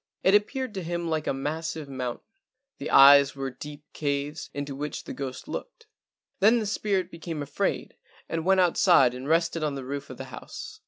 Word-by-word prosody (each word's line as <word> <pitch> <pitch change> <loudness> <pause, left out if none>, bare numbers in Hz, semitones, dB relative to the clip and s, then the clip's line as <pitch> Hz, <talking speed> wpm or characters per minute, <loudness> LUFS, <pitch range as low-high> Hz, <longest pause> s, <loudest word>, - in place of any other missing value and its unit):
It 190 - +4
appeared 240 +4 +1
to 190 - -4
him 170 0 -3
like 155 -1 -1
a - - +2
massive 155 +3 -4
mountain. 130 -3 -5 0.5
The 140 - -4
eyes 140 0 +8
were 135 -1 -4
deep 150 +3 -10
caves, 145 +1 -3
into 145 -1 -5
which 145 +1 -5
the - - -7
ghost 135 -2 -6
looked. - - -7 0.5
Then 220 +5 +5
the 220 - -1
spirit 195 -3 -1
became 165 -2 -5
afraid 145 0 -2 0.3
and 165 -1 -3
went 190 +1 +4
outside 170 -7 +5
and 130 +3 -6
rested 165 0 +1
on 150 -2 -1
the 135 -2 -6
roof 140 +1 -5
of 130 - -9
the 135 - -6
house. - - -9
150 Hz, 190 wpm, -27 LUFS, 140-175 Hz, 0.5 s, eyes